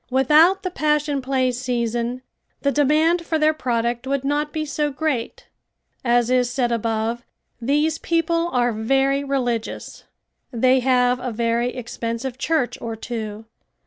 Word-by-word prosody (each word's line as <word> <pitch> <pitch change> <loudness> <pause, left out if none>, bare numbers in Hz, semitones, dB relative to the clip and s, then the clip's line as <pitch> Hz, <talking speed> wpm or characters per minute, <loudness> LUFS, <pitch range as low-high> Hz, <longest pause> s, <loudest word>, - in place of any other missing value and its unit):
Without 305 +9 +4
the 370 - -2
Passion 300 -3 0
Play 260 -1 +1
season 240 0 -2 0.4
the 280 - +3
demand 310 +4 +3
for 325 -1 -1
their 310 0 +3
product 240 -3 -2
would 275 0 -1
not 295 +2 -1
be 310 0 -3
so 295 0 -1
great. 275 -4 -3 0.6
As 240 0 +2
is 250 -1 +3
said 245 -1 0
above 230 0 -1 0.4
these 295 +6 +1
people 335 0 0
are 245 -1 +1
very 270 +5 +1
religious. 245 -5 -3 0.5
They 255 +2 +3
have 250 -1 +2
a 250 -1 -4
very 235 +2 0
expensive 240 +1 -5
church 305 -4 0
or 225 -1 -4
two. 220 -2 -6
255 Hz, 140 wpm, -22 LUFS, 235-295 Hz, 0.6 s, Without